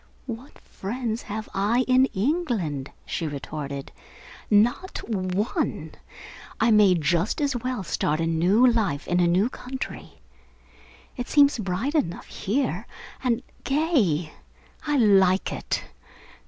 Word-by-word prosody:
"What 245 +2 -8
friends 230 +2 -4
have 215 +1 -5
I 210 +6 +2
in 255 0 +5
England?" 200 - -1 0.2
she 165 - -3
retorted. 140 -1 -5 0.6
"Not 235 - +2
one! 195 0 -1 0.7
I 225 +1 +4
may 210 -4 +6
just 170 - +1
as 285 -3 0
well 245 -3 -2
start 155 -2 -1
a 165 - +1
new 175 +9 +3
life 215 - +1
in 175 - +1
a 175 - +4
new 185 +6 +3
country. 260 +1 -7 1.0
It 245 - -4
seems 285 -4 +5
bright 210 +8 -2
enough 275 - -1
here, 220 - -2 0.4
and 245 -1 +1 0.2
gay. 255 - +1 0.5
I 295 -1 +2
like 195 -5 +4
it. - - -3
210 Hz, 120 wpm, -25 LUFS, 175-255 Hz, 1.0 s, may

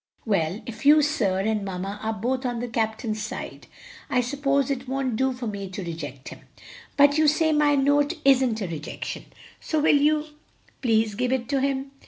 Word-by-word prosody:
"Well, 195 -2 0
if 235 - -8
you, 300 +2 +6
sir, 210 -11 +1
and 215 0 0
mamma 195 +1 -5
are 220 - -1
both 250 +5 -2
on 245 -2 -2
the 245 - -3
captain's 220 -1 -2
side, 215 - -7 0.4
I 255 - +2
suppose 275 +2 0
it 265 -1 -4
won't 265 -2 -1
do 265 +3 +1
for 250 -1 -6
me 200 -3 -5
to 190 +1 -6
reject 145 -6 -7
him. - - -11 0.6
But 285 +1 +5
you 310 - +4
say 315 +2 +3
my 295 -1 +3
note 285 +3 +2
isn't 255 -5 +4
a 195 - -2
rejection, 160 -2 -6 0.3
so 315 - -1
will 295 - +4
you 300 +1 +2 0.6
please 220 -3 +2
give 250 +4 -1
it 255 -3 -1
to 275 -2 +1
him? 270 0 -1
250 Hz, 190 wpm, -25 LUFS, 215-280 Hz, 0.6 s, you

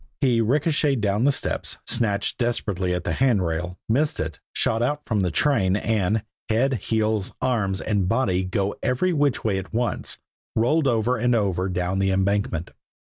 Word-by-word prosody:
He 125 -4 +3
ricocheted 140 +2 +2
down 105 +3 +1
the 145 - +5
steps, - - -2
snatched 105 0 0
desperately 100 -7 -1
at 90 - -3
the - - -2
handrail, 90 -8 0
missed 145 +7 +1
it, 80 +1 -4
shot 115 - 0
out 145 +5 0
from 110 -3 0
the 90 -2 +1
train, 95 - +2
and, 105 -1 0 0.3
head, 125 +5 +2 0.2
heels, 110 -3 0
arms 110 -7 0
and 100 -4 0
body 95 -6 +1
going 95 +2 -2
every 175 +9 +1
which 145 -4 +1
way 100 -4 +1
at 95 - -9
once, 120 +1 -1 0.4
rolled 140 +7 +2
over 120 +1 +1
and 120 +1 +2
over 95 -4 0
down 90 +1 -1
the 95 0 +2
embankment. 95 -3 0
110 Hz, 165 wpm, -24 LUFS, 95-125 Hz, 0.4 s, the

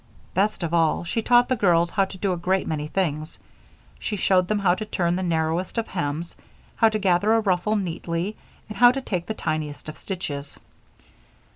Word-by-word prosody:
Best 200 0 0
of 170 0 -2
all, 165 -1 +2
she 200 +7 -2
taught 245 +2 +4
the 255 - +1
girls 175 -5 +3
how 195 -2 +2
to 190 - -10
do 190 0 0
a - - -1
great 185 +2 0
many 150 -1 -3
things. 155 -3 -2 0.6
She 210 - -3
showed 185 -2 +2
them 215 - +1
how 195 -3 +3
to 215 - -3
turn 175 -4 0
the 185 - -2
narrowest 165 +2 -1
of 230 - 0
hems, 165 -1 -3 0.4
how 225 - +5
to 215 - -1
gather 200 +1 +2
a - - +4
ruffle 205 0 +1
neatly, 175 0 -3 0.3
and 210 -2 -8
how 245 0 +8
to 270 +2 -3
take 180 -8 -3
the 220 - -3
tiniest 155 -4 -3
of 155 - -10
stitches. 145 -7 -5
185 Hz, 195 wpm, -24 LUFS, 165-210 Hz, 0.6 s, how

